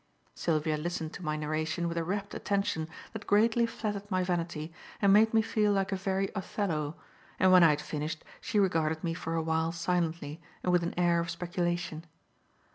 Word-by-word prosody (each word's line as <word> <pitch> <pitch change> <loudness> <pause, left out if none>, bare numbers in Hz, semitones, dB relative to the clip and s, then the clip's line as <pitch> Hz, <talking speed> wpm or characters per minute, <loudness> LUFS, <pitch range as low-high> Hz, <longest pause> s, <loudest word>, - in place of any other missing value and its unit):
Sylvia 155 -2 0
listened 165 0 -3
to - - -8
my 155 -2 -1
narration 155 +2 -1
with 170 - -3
a 165 - 0
rapt 200 +4 -3
attention 195 -6 -1 0.3
that 220 -2 -7
greatly 230 +3 +4
flattered 205 -3 -4
my 185 -2 +1
vanity 170 -3 -2 0.3
and 200 -1 +5
made 220 +2 +6
me 225 -1 +4
feel 210 -2 +2
like 195 0 0
a - - +1
very 195 0 -1
Othello, 170 -6 -2 0.4
and 185 0 +5
when 180 -1 +8
I 165 - +8
had 150 0 +1
finished, 150 +1 -4 0.2
she 250 -5 -2
regarded 160 -5 +2
me 165 -1 0
for 165 0 -3
a 165 - 0
while 160 0 +1
silently 165 -2 -1 0.2
and 180 - +2
with 180 -1 +4
an 170 - -3
air 175 -1 +3
of 170 0 -2
speculation. 175 -1 -2
175 Hz, 190 wpm, -30 LUFS, 160-195 Hz, 0.4 s, when